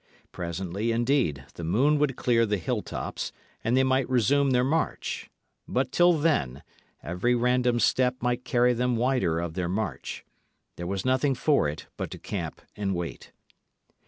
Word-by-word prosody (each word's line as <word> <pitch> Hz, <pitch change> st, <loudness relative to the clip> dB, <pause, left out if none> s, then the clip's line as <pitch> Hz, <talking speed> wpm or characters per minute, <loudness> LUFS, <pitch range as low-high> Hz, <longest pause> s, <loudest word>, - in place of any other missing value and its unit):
Presently, 90 Hz, +5 st, -3 dB
indeed, 115 Hz, -, +1 dB
the 85 Hz, -, -8 dB
moon 130 Hz, -, +3 dB
would 145 Hz, -3 st, +1 dB
clear 115 Hz, -3 st, +2 dB
the 105 Hz, 0 st, +1 dB
hilltops, 85 Hz, -, -3 dB, 0.3 s
and 115 Hz, +3 st, +2 dB
they 130 Hz, -, +5 dB
might 130 Hz, -1 st, +1 dB
resume 135 Hz, +3 st, +3 dB
their 125 Hz, -1 st, +3 dB
march. 155 Hz, +5 st, -1 dB, 0.4 s
But 130 Hz, 0 st, 0 dB
till 175 Hz, 0 st, +5 dB
then, 145 Hz, -, 0 dB, 0.4 s
every 90 Hz, -, 0 dB
random 125 Hz, 0 st, +2 dB
step 125 Hz, +1 st, +3 dB
might 125 Hz, +1 st, -1 dB
carry 125 Hz, -2 st, +3 dB
them 125 Hz, +1 st, 0 dB
wider 115 Hz, -9 st, +1 dB
of 85 Hz, -1 st, -3 dB
their 90 Hz, -1 st, -2 dB
march. 100 Hz, +1 st, -3 dB, 0.5 s
There 85 Hz, -, -5 dB
was 95 Hz, +3 st, -3 dB
nothing 130 Hz, +2 st, +2 dB
for 140 Hz, -, +2 dB
it 75 Hz, -, -7 dB
but -, -, -3 dB
to -, -, -7 dB
camp -, -, -5 dB
and 100 Hz, -2 st, -1 dB
wait. 85 Hz, -1 st, -6 dB
120 Hz, 160 wpm, -27 LUFS, 95-130 Hz, 0.5 s, they